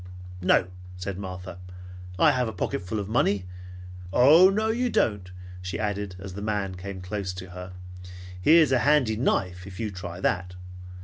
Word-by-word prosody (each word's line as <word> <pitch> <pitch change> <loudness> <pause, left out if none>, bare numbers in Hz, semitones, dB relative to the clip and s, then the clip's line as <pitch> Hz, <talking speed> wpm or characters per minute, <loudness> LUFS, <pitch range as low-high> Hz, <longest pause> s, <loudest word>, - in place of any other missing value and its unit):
"No," 90 0 +4 0.3
said 95 +1 -5
Martha. 90 -2 -7 0.6
"I 155 - +6
have 125 -3 0
a - - -3
pocketful 90 +2 -3
of 100 - -4
money. 100 -4 +1 0.7
No, 185 - +6
you 245 +2 0
don't," 100 - 0 0.3
she 90 +1 -4
added 105 -3 -3
as 95 0 -8
the 100 - -7
man 105 -2 -2
came 95 +1 -7
close 95 0 -4
to 95 0 -8
her. 90 +1 -8 0.7
"Here's 155 - +6
a 130 - +4
handy 135 -5 +3
knife 90 -6 -1
if 95 -2 -10
you 110 -2 -2
try 90 -2 -7
that. 90 -1 -1
100 Hz, 160 wpm, -26 LUFS, 90-120 Hz, 0.7 s, I